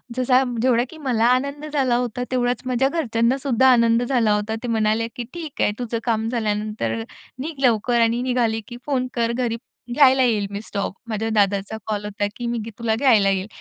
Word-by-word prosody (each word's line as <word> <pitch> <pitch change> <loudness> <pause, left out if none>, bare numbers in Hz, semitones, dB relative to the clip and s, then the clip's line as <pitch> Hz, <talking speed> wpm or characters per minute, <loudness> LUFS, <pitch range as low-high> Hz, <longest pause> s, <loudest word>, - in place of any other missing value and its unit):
जसा, 255 +1 +3 0.2
जेवढा 245 -2 +3
की 320 - -12
मला 250 -7 0
आनंद 280 +4 +1
झाला 260 -4 +2
होता 245 0 -2
तेवढाच 245 -1 0
माझ्या 255 +1 +1
घरच्यांनासुद्धा 260 -2 +1
आनंद 235 -1 +4
झाला 240 -4 +2
होता. 210 +2 -1
ते 245 - -3
म्हणाले, 220 0 +1
"की 245 - -4
ठीक 325 -4 -6
आहे. - - +3
तुझं 235 -1 -2
काम 225 -2 0
झाल्यानंतर 210 - -2 0.4
निघ 310 +5 -4
लवकर 235 0 +2
आणि 230 +1 +2
निघाली 240 -3 0
की 240 - -8
फोन 260 -3 0
कर 235 -1 0
घरी, 235 -2 -1 0.4
घ्यायला 265 -1 +5
येईल." 215 -5 +1
मी 200 +1 -4
स्टॉप 200 -2 -3 0.2
माझ्या 220 0 -2
दादाचा 200 +1 +1
कॉल 210 -1 -2
होता, 205 0 -2
"की 240 - -4
मी 235 0 -1 0.2
तुला 225 -1 0
घ्यायला 225 -6 +4
येईल." 195 0 -1
235 Hz, 185 wpm, -22 LUFS, 220-255 Hz, 0.4 s, घ्यायला